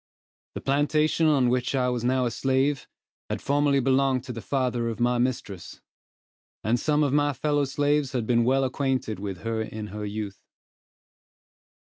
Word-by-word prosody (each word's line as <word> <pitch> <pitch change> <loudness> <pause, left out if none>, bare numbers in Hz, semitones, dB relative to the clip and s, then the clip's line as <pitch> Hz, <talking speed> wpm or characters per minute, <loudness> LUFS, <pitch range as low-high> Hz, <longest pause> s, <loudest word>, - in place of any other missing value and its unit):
The - - -4
plantation 150 +3 +2
on 135 -5 +3
which 125 +2 0
I 125 -1 +1
was 120 -2 -2
now 130 +1 +2
a 120 - -1
slave, 135 +3 0 0.4
had - - -2
formerly 145 0 +2
belonged 130 0 +2
to 125 - -6
the 115 - -6
father 125 -3 -1
of 115 - -5
my 120 0 +2
mistress; 115 -7 -3 0.8
and 115 +4 +1
some 150 +2 +2
of 140 -2 0
my 145 0 +2
fellow 145 +2 0
slaves 145 0 0
had 120 -4 -1
been 120 0 +3
well 135 +3 +2
acquainted 130 -5 -1
with 95 -2 -5
her 115 -1 -2
in 110 -1 -6
her 105 0 -5
youth. 100 -2 -5
130 Hz, 165 wpm, -26 LUFS, 115-140 Hz, 0.8 s, on